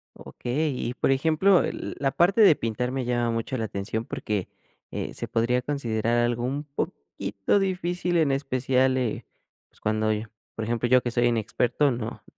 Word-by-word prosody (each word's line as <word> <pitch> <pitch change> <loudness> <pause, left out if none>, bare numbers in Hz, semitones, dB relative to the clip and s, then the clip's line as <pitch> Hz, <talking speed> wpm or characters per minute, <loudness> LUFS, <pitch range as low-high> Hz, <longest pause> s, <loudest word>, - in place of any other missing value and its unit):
Okey, 150 +6 -2 0.2
y, - - -3
por - - 0
ejemplo, 160 +7 +4
eh, - - 0
l - - -6
la 135 -1 0
parte 190 +9 +3
de 195 -7 +8
pintar 115 +1 -2
me 135 0 -2
llama 120 -1 0
mucho 115 +3 -2
la 115 - -1
atención 110 +2 -4
porque, 105 -5 -3 0.4
eh, - - -4
se - - -4
podría 125 +2 +1
considerar 120 -5 0
algo 120 0 +1
un 140 +4 -2
poquito 100 - -2
difícil, 180 -2 0
en 155 -4 +3
especial, 130 -1 +1
eh, 125 -4 -2 0.4
pues - - -25
cuando 110 0 +1
yo 110 +1 -2 0.3
por 110 - -3
ejemplo, 120 +1 0
yo 125 +1 +5
que 120 - -2
soy 120 +1 +1
inexperto, 120 +4 +1
no, 115 -3 -4
125 Hz, 180 wpm, -26 LUFS, 115-140 Hz, 0.4 s, de